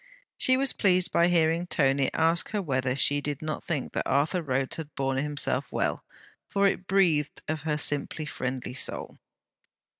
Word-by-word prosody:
She 260 0 +3
was 270 0 +2
pleased 185 -3 +2
by 170 - +4
hearing 170 0 +2
Tony 135 -4 +2
ask 165 +1 +2
her 210 -2 -1
whether 130 -4 -1
she 145 +1 +2
did 145 0 -4
not 155 -1 -4
think 150 -6 -3
that - - -2
Arthur 150 +6 +1
Rhodes 135 -3 -1
had 155 -2 -8
borne 135 -1 -1
himself 145 0 0
well; - - -1 0.5
for 200 0 +2
it 190 -1 0
breathed 170 -7 +1
of 155 0 -2
her 150 0 -1
simply 145 +1 -1
friendly 125 -3 -4
soul. 135 - -3
150 Hz, 170 wpm, -27 LUFS, 140-175 Hz, 0.5 s, by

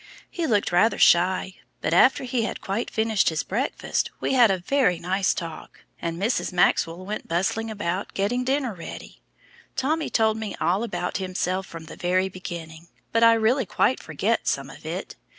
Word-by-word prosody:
He 340 -2 -2
looked 205 -6 +1
rather 180 +6 +3
shy, 185 +2 +3 0.2
but - - -1
after 265 - +5
he 250 -1 -1
had 220 - -3
quite 200 +5 -3
finished 220 -2 +2
his 160 -3 -2
breakfast, 240 +8 -1
we - - -1
had 245 -4 +6
a 190 - +2
very 185 -1 +1
nice 190 +3 0
talk, 165 -3 -7 0.2
and 170 0 -3
Mrs. 220 +2 0
Maxwell 175 0 +2
went 210 +2 -5
bustling 195 +6 -1
about 200 -3 -3
getting 240 +6 0
dinner 265 -2 0
ready. 170 -3 -10 0.5
Tommy 305 +4 0
told 220 -1 +2
me 220 -3 -4
all 185 +4 +1
about 230 -3 -2
himself 185 0 -2
from 165 -1 -9
the - - -10
very 185 +2 +1
beginning, 170 -3 -8 0.2
but 230 0 +3
I 230 0 +8
really 225 +1 +2
quite 260 - +1
forget - - -1
some - - -1
of - - -12
it. - - -5
195 Hz, 175 wpm, -25 LUFS, 180-230 Hz, 0.5 s, I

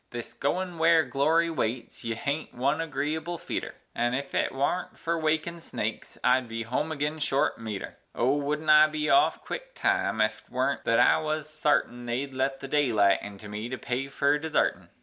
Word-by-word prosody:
This 120 -1 -7
goin' 175 +4 -2
ware 165 0 +5
glory 155 +6 +2
waits 120 -5 -3
ye 115 -1 -2
haint 140 +7 -3
one 140 +6 +1
agreeable 160 +2 -2
feetur, - - -5 0.2
And 120 +1 0
ef 140 +1 -4
it - - +1
worn't 155 +7 -1
fer 170 0 -1
wakin' 160 +1 -1
snakes, - - -5
I'd 125 -1 +3
home 145 +7 -2
agin 150 +1 -2
short 140 -4 +1
meter; 110 -3 -6 0.2
O, 130 +4 +2
wouldn't 150 +2 0
I 150 0 +8
be 155 0 -1
off, 355 - +4
quick - - -6
time, 390 - +1
ef't 110 0 0
worn't 130 +2 -1
thet 115 - +3
I - - +5
wuz 155 0 -1
sartin 150 -5 0
They'd 130 +3 -2
let 135 +1 -1
the 135 - -5
daylight 115 -9 +3
into 105 0 -9
me 105 +3 -5
to 130 - -4
pay 125 +1 -2
me 135 - -5
fer 140 +1 +1
desartin! 160 0 0
140 Hz, 185 wpm, -27 LUFS, 120-155 Hz, 0.2 s, I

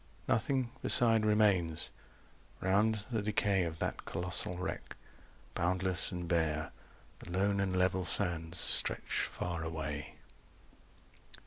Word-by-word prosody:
Nothing 125 +1 0
beside 115 -3 +3
remains. 100 -7 +2 0.7
Round 105 +3 +1
the 110 -3 0
decay 100 -3 +1
Of 80 -1 -5
that - - -3
colossal 90 0 0
wreck, 90 - -5 0.6
boundless 90 0 0
and 90 -1 -5
bare 80 -3 0 0.5
The - - -12
lone 100 +3 +1
and 95 -1 0
level 90 0 +1
sands 85 -3 +4
stretch - - 0
far 85 -2 -4
away. 80 -2 -5
90 Hz, 110 wpm, -33 LUFS, 85-105 Hz, 0.7 s, sands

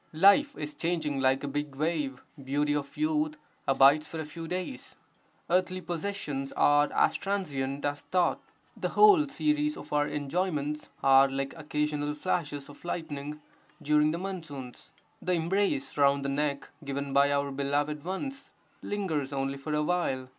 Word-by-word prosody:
Life 240 - +5
is 150 0 -5
changing 160 -3 -1
like 135 +1 +2
a - - -2
big 145 0 -3
wave, 150 -3 -1 0.2
beauty 145 +2 +1
of 140 -1 -4
youth 305 0 0 0.3
abides 140 +3 +5
for 160 - -6
a 160 - -3
few 165 +2 -8
days; 185 +9 -5 0.5
earthly 185 +1 +1
possessions 170 -6 -4
are 145 0 +4
as - - +3
transient 145 -9 -2
as 145 0 -1
thought; 180 -1 +1 0.3
the - - -2
whole 400 -8 +6
series 300 +1 0
of - - -9
our 145 0 +2
enjoyments 150 0 -2
are 135 0 +7
like 135 0 -3
(occasional) 150 -1 -2
flashes 145 -4 -2
of 145 - -14
lightning 150 -3 -5 0.4
during 150 0 +3
the 165 - -1
monsoons; 165 -9 -7 0.3
the 180 - 0
embrace 170 -4 0
round 140 0 +4
the - - 0
neck 140 0 -1
given 140 0 -3
by 140 +1 +5
our 140 0 0
beloved 145 +2 -1
ones 270 - -5 0.3
lingers 160 -9 -2
only 135 0 -1
for 150 +2 -3
a 150 - +1
while. 145 -7 -1
150 Hz, 155 wpm, -29 LUFS, 140-180 Hz, 0.5 s, are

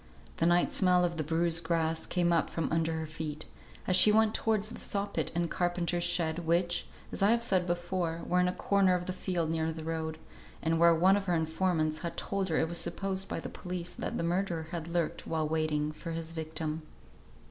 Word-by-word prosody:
The 165 - +2
night 175 0 +3
smell 180 -2 +4
of 170 -1 -2
bruised 165 +1 +2
grass 160 -1 0
came 175 -1 +1
up 165 - +2
from 165 - -2
under 165 0 +1
her 160 0 -3
feet, 155 -1 -5 0.4
as 185 - +2
she 210 - +7
went 220 0 +4
towards 215 -1 0
the - - -8
saw 200 0 -2
pit 200 - -3
and 170 0 +1
carpenter's 175 0 -1
shed, 165 -1 +1
which, 175 +1 0 0.2
as - - -5
I 200 - +5
have 235 +1 +3
said 185 -5 +1
before, 175 -1 -2
were 180 - +2
in 180 - +3
a - - +1
corner 195 -1 +2
of 180 0 -3
the 185 - -3
field 175 -3 -2
near 160 0 0
the 160 0 -7
road, 160 -1 -3 0.4
and 165 0 0
where 170 0 +6
one 185 +4 +5
of 200 - -3
her 175 - +2
informants 160 -1 0
had 170 0 -5
told 195 -1 -2
her 160 - +1
it 160 - +2
was 170 +1 +1
supposed 195 -1 -1
by - - -2
the - - -6
police 180 -1 -5
that - - -4
the - - -1
murderer 170 -2 -1
had 165 -2 -4
lurked 170 -1 -2
while 160 -1 0
waiting 155 -1 0
for 155 +2 -8
his 165 0 -4
victim. 160 -1 -4
170 Hz, 215 wpm, -30 LUFS, 160-180 Hz, 0.4 s, she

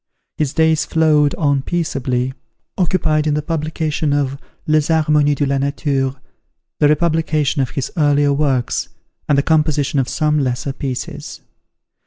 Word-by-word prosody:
His 150 -3 -1
days 160 -1 +3
flowed 150 -3 +2
on 140 -4 +1
peaceably, 130 -6 -2 0.4
occupied 160 -4 +1
in 150 - +1
the 150 - -2
publication 155 -1 -1
of 140 -2 0 0.3
"Les 155 -1 +2
Harmonies 150 -2 +2
de 145 - 0
la 140 0 0
Nature," 140 -1 -1 0.6
the 150 - +5
republication 155 -2 +1
of 130 - -1
his 135 - -4
earlier 145 -3 +3
works, 135 -4 0 0.4
and 145 - +4
the 140 - +3
composition 150 -3 +1
of 130 - -1
some 150 -1 +1
lesser 135 0 -2
pieces. 130 -2 -6
145 Hz, 140 wpm, -18 LUFS, 140-155 Hz, 0.6 s, the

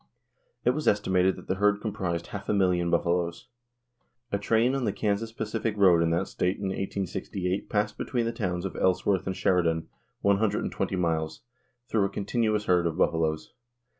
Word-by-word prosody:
It - - +5
was 155 - -3
estimated 95 -2 +3
that - - -11
the - - +1
herd 105 0 +4
comprised 95 -6 -3
half 100 -1 -7
a - - +2
million 90 -3 +2
buffaloes. 85 +4 0 0.8
A 100 - 0
train 115 +5 +2
on 135 -1 -1
the - - +1
Kansas 110 +1 -1
Pacific 110 -1 -3
road 90 -4 +6
in 85 - +2
that 85 +3 0
state 90 +2 -1
in 100 -1 -3
1868 95 0 -3
passed 105 0 -1
between 120 -3 -1
the 115 - 0
towns 95 -6 -2
of 95 - -4
Ellsworth 95 0 +1
and 95 - -2
Sheridan 85 -3 +1 0.3
one 100 0 +4
hundred 105 -1 +1
and - - -3
twenty 95 0 -2
miles 80 -3 -1 0.5
through 105 -3 +2
a - - -1
continuous 105 +1 0
herd 90 -2 +3
of 80 0 -3
buffaloes. 80 -3 0
95 Hz, 180 wpm, -27 LUFS, 90-105 Hz, 0.8 s, road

